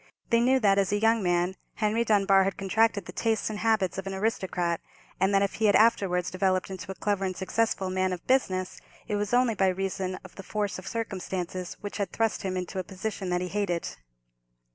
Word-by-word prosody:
They 230 - +5
knew 260 +3 +4
that, 200 -2 +4
as 195 -1 +1
a 205 - +2
young 225 +1 +3
man, 175 0 +1 0.2
Henry 220 +1 +1
Dunbar 195 -3 +4
had 195 0 -2
contracted 200 0 +1
the - - -7
tastes 225 -1 0
and 210 - -5
habits 215 -4 +1
of 195 - -6
an 195 - -3
aristocrat, 190 -5 -1 0.4
and 190 +2 +3
that, 195 0 +4
if 200 - -1
he - - +4
had 205 - +5
afterwards 185 -5 +3
developed 185 0 0
into 190 0 -6
a - - -7
clever 205 -1 -1
and 185 -1 -2
successful 195 -1 0
man 185 0 +1
of 180 -2 -5
business, 190 -8 0 0.3
it 210 - -1
was 205 0 -1
only 245 -1 +3
by 195 -2 +2
reason 185 0 -2
of 185 - -12
the - - -6
force 205 -1 -2
of 185 - -10
circumstances, 185 -5 -4
which 205 -1 -5
had 200 -2 -2
thrust 225 -1 0
him 185 -1 -2
into 185 +1 -4
a - - -2
position 195 0 -5
that 180 0 0
he 180 - -2
hated. 180 -3 -1
195 Hz, 215 wpm, -28 LUFS, 185-215 Hz, 0.4 s, They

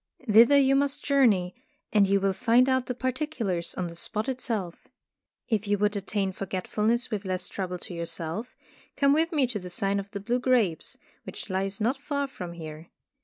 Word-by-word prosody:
Thither 230 +6 +7
you 275 -1 +4
must 280 0 0
journey, 220 -11 +3 0.4
and 205 -2 +5
you 200 +1 +3
will 195 0 +1
find 245 +4 +3
out 260 -1 +1
the 250 - -3
particulars 255 - -2
on 180 - -2
the 170 -1 -7
spot 215 +7 -1
itself. 225 -9 -3 0.6
If 215 -3 0
you 205 0 +2
would 210 +1 +1
attain 200 -1 -1
forgetfulness 210 +6 -1
with 210 -2 -2
less 185 -1 -2
trouble 180 -2 -4
to 180 - -8
yourself, 170 +6 -4 0.4
come 280 0 +4
with 320 +2 +2
me 295 -5 +2
to 235 -4 -4
the 180 -1 -8
Sign 195 +3 0
of 200 0 -7
the 200 -1 -5
Blue 240 +5 -1
Grapes, 240 -10 +1 0.3
which - - -8
lies 195 +1 -1
not 245 +6 0
far 280 0 -2
from 180 -11 -7
here. 160 -1 -9
210 Hz, 185 wpm, -27 LUFS, 185-255 Hz, 0.6 s, Thither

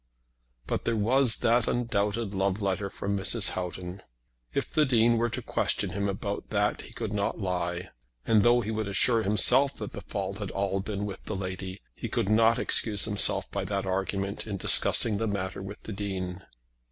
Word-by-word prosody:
But - - -2
there 115 - +1
was 120 +3 +3
that 115 0 +3
undoubted 110 -2 -1
love 95 +1 0
letter 100 0 -1
from 100 +1 -3
Mrs. 95 -1 +2
Houghton. 90 +1 -5 0.5
If - - -3
the 155 - +4
Dean 120 -4 +3
were 120 +1 +1
to - - -5
question 95 - -1
him 100 +2 -1
about 100 +1 -4
that 105 -1 0
he - - -12
could 110 -3 -5
not 100 +1 -1
lie. 90 -2 -3 0.3
And 110 -2 +4
though 120 +2 +4
he 110 0 -3
would 110 -1 -2
assure 115 +4 +4
himself 125 +7 +4
that 105 - -6
the - - -8
fault 100 0 -4
had 100 -3 -4
all 100 0 -1
been 105 0 -3
with 100 -2 -7
the 110 - -4
lady, 95 0 -5
he - - -6
could 95 - -1
not 115 +1 +4
excuse 105 -3 +1
himself 100 -2 +2
by 100 - -2
that 100 0 -2
argument 95 +2 -2
in 100 -2 -3
discussing 105 +2 +3
the 115 - 0
matter 95 -2 -3
with 95 +2 -9
the 110 - -6
Dean. 95 -2 -4
100 Hz, 190 wpm, -28 LUFS, 95-110 Hz, 0.5 s, the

